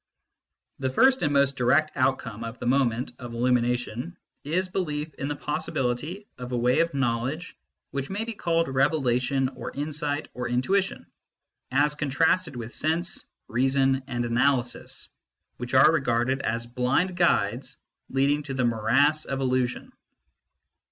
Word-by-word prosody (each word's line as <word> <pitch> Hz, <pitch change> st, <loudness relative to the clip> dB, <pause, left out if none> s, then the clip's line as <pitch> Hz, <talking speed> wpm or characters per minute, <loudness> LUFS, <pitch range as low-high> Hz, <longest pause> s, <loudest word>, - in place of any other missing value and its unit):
The 130 Hz, -1 st, 0 dB
first 260 Hz, -, +4 dB
and 145 Hz, -, +1 dB
most 140 Hz, -1 st, +3 dB
direct 140 Hz, +5 st, +3 dB
outcome 125 Hz, -4 st, 0 dB
of 115 Hz, +2 st, -6 dB
the -, -, -6 dB
moment 125 Hz, -1 st, +1 dB
of 120 Hz, -2 st, -7 dB
illumination 125 Hz, +4 st, 0 dB, 0.3 s
is 180 Hz, +6 st, 0 dB
belief 155 Hz, -5 st, -3 dB
in 140 Hz, -, -4 dB
the 145 Hz, -, -2 dB
possibility 150 Hz, -, -2 dB
of 125 Hz, 0 st, -6 dB
a 125 Hz, -, 0 dB
way 125 Hz, +1 st, +3 dB
of 165 Hz, -3 st, +1 dB
know 120 Hz, -4 st, +1 dB
ledge 155 Hz, +9 st, -5 dB, 0.4 s
which 140 Hz, -1 st, -3 dB
may 200 Hz, +3 st, -2 dB
be 230 Hz, 0 st, -4 dB
called 165 Hz, -4 st, 0 dB
revelation 135 Hz, -1 st, +1 dB
or -, -, -7 dB
insight 145 Hz, 0 st, -2 dB
or 125 Hz, -1 st, -3 dB
in 125 Hz, +1 st, 0 dB
tuition, 195 Hz, +4 st, 0 dB, 0.6 s
as 145 Hz, +3 st, +3 dB
contrasted 155 Hz, +2 st, +1 dB
with 120 Hz, 0 st, -6 dB
sense, 165 Hz, +3 st, -1 dB, 0.2 s
reason, 135 Hz, +2 st, +2 dB
and 120 Hz, -3 st, -2 dB
analysis, 125 Hz, +1 st, 0 dB, 0.5 s
which 125 Hz, +1 st, -4 dB
are 130 Hz, +4 st, +8 dB
regarded 130 Hz, -2 st, +1 dB
as 115 Hz, +1 st, -1 dB
blind 125 Hz, +10 st, 0 dB
guides 120 Hz, -, +1 dB, 0.3 s
leading 140 Hz, +2 st, +2 dB
to 140 Hz, -2 st, -5 dB
the 130 Hz, -1 st, +1 dB
morass 130 Hz, +7 st, +2 dB
of 135 Hz, -1 st, -3 dB
illusion. 130 Hz, -2 st, -1 dB
135 Hz, 145 wpm, -26 LUFS, 125-150 Hz, 0.6 s, are